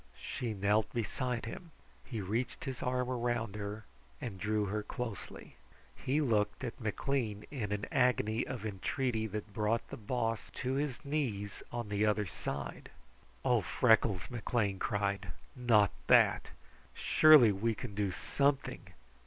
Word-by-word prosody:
She 115 -3 -4
knelt 105 +2 +2
beside 120 +1 -2
him. 165 +9 -7 0.3
He 115 -5 -5
reached 110 +6 -2
his 130 -2 -4
arm 125 0 0
around 120 -4 -1
her 105 +1 -5 0.3
and 105 -6 -6
drew 105 +1 +1
her 105 +2 -1
closely. 115 0 -6 0.4
He 145 +4 0
looked 105 -4 +1
at 120 0 -5
McLean 110 -1 -1
in 115 -8 -3
an 105 0 -1
agony 120 -3 +2
of 120 -5 -5
entreaty 110 +3 -1
that 105 0 -6
brought 110 +2 0
the - - -6
Boss 115 0 -2
to 130 +1 -2
his 145 +1 -2
knees 120 -9 -2
on 120 -3 -4
the 105 0 +1
other 105 0 +2
side. 70 -4 -5 0.6
"Oh, - - +4
Freckles!" 110 -2 +3
McLean 110 -4 0
cried. 100 -4 -1 0.2
"Not 115 -6 +4 0.2
that! - - +5 0.5
Surely 155 -8 +7
we 110 +3 0
can 110 0 -6
do 100 -1 0
something! 140 +8 0
110 Hz, 140 wpm, -33 LUFS, 105-125 Hz, 0.6 s, Surely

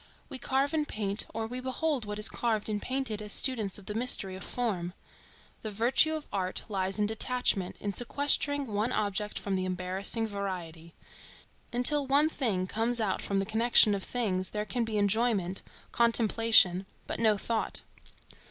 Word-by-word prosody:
We 260 - -4
carve 270 +4 0
and 305 -2 0
paint, 205 -1 -2
or 225 0 -3
we 245 +3 -4
behold 260 0 -1
what 210 0 -5
is 210 - +2
carved 220 -3 -1
and 210 -1 -2
painted, 255 -5 -2
as 210 -1 -5
students 220 -7 0
of 200 - -13
the 210 - -4
mystery 220 -5 0
of 190 - -8
Form. 190 -8 -2 0.7
The 215 - -4
virtue 240 +9 +3
of 310 - -6
art 185 -2 -2
lies 190 -2 -1
in 210 - +2
detachment, 220 -3 0
in 200 -1 -3
sequestering 285 +4 +1
one 215 +1 -1
object 210 -2 -1
from 200 -1 -2
the 185 0 -1
embarrassing 185 +5 -1
variety. 180 -6 -6 0.8
Until 270 +4 +2
one 285 +3 +4
thing 215 -12 -1
comes 230 +5 +1
out 205 -4 0
from 200 - -2
the 195 - +1
connection 220 0 +5
of 195 -1 -2
things, 190 -7 -1
there 210 0 -3
can 240 +2 -1
be 220 -2 -2
enjoyment, 205 -3 +1 0.3
contemplation, 225 -5 +4 0.2
but - - -4
no 220 -2 +3
thought. 225 +2 -2
215 Hz, 170 wpm, -29 LUFS, 195-245 Hz, 0.8 s, connection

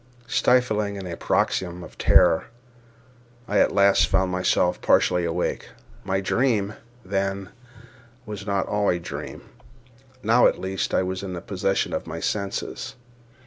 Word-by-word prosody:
Stifling 110 -4 +2
in 100 -1 -6
a 85 -2 -5
paroxysm 90 +1 -1
of - - -12
terror, 80 - +4 1.0
I 105 - +2
at - - +4
last 100 0 +4
found 95 -1 +1
myself 90 -1 +1
partially 90 -1 +3
awake. 85 +1 -2 0.3
My 95 0 0
dream, 110 -1 +1 0.3
then, 95 0 -2 0.8
was 105 -2 -7
not 100 -1 0
all 105 -1 0
a 90 - +2
dream. 85 - -7 0.8
Now, 115 +3 +5
at - - 0
least, 95 0 -2
I - - +3
was 95 0 -3
in 95 -3 -5
possession 95 +1 -1
of - - -3
my 80 +1 -5
senses. 100 +2 -3
95 Hz, 140 wpm, -24 LUFS, 90-100 Hz, 1.0 s, Now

